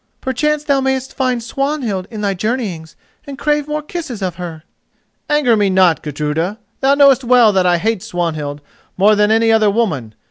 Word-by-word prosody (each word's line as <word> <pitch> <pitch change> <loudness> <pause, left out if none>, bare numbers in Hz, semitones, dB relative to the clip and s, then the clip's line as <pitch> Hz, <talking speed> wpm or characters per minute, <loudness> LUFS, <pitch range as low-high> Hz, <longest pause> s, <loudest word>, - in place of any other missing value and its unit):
Perchance 300 +3 -1
thou 280 -2 +1
mayest 265 0 -2
find 255 -3 -1
Swanhild 240 -7 -2
in 220 -3 -7
thy 200 -1 0
journeyings 190 -6 -4 0.3
and 275 -1 -7
crave 295 0 0
more 300 0 -3
kisses 300 - -6
of 180 -3 -3
her?" 165 -3 -7 0.7
"Anger 295 -6 +3
me 205 -2 +2
not, 185 -3 +3
Gudruda! 150 +6 -3 0.2
thou 275 +1 +3
knowest 275 -2 +5
well 240 -3 +5
that 185 -1 +2
I 175 -1 +3
hate 220 +2 -1
Swanhild 155 -5 -4 0.4
more 205 +3 +5
than 210 0 +2
any 225 +1 +3
other 220 -2 +4
woman. 155 - -2
220 Hz, 175 wpm, -17 LUFS, 180-265 Hz, 0.7 s, knowest